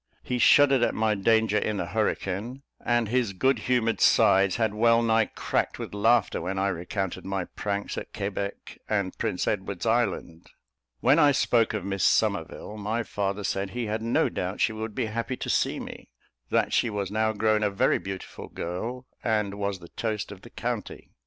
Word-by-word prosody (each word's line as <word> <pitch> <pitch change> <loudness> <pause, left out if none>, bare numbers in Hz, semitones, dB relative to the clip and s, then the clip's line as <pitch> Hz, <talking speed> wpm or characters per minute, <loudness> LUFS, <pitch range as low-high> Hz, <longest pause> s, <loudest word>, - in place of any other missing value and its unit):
He 125 -1 -2
shuddered 135 0 +6
at - - +1
my 110 -1 +2
danger 110 +1 +2
in 105 0 -2
the 90 - -2
hurricane, 110 +5 -2 0.2
and 120 -2 +1
his 120 -2 0
good 130 +8 +2
humoured 115 -3 +1
sides 95 -1 +5
had 110 -3 0
well 115 +2 +4
nigh 115 -1 +3
cracked - - -2
with - - -7
laughter 110 +1 +2
when 95 +1 -3
I 100 +1 +1
recounted 90 +1 -3
my 95 -2 -2
pranks 100 +1 -3
at - - -10
Quebec 100 0 -5
and 100 -3 -1
Prince 90 - -1
Edward's 95 0 -2
Island. 110 -8 -1 0.5
When 135 +6 +5
I 145 -2 +6
spoke 115 -5 +2
of 100 -3 -4
Miss 95 -2 -2
Somerville, 105 - 0
my 110 +3 -2
father 100 -1 -3
said 95 0 -1
he 120 +3 -3
had 110 +1 -2
no 115 +1 +2
doubt 90 +2 -4
she 110 - +2
would 110 -1 -5
be 125 - 0
happy 115 +3 -3
to - - -5
see - - +1
me - - -9 0.4
that - - +1
she 120 - +2
was 100 -2 -3
now 110 +1 +1
grown 110 0 +1
a 105 - +2
very 100 - +2
beautiful 95 -1 -7
girl, 115 +9 -5 0.2
and 105 -3 0
was 100 -1 -1
the 85 -2 -13
toast 110 -3 -3
of 95 -2 -10
the - - -13
county. - - -5
105 Hz, 185 wpm, -26 LUFS, 100-115 Hz, 0.5 s, shuddered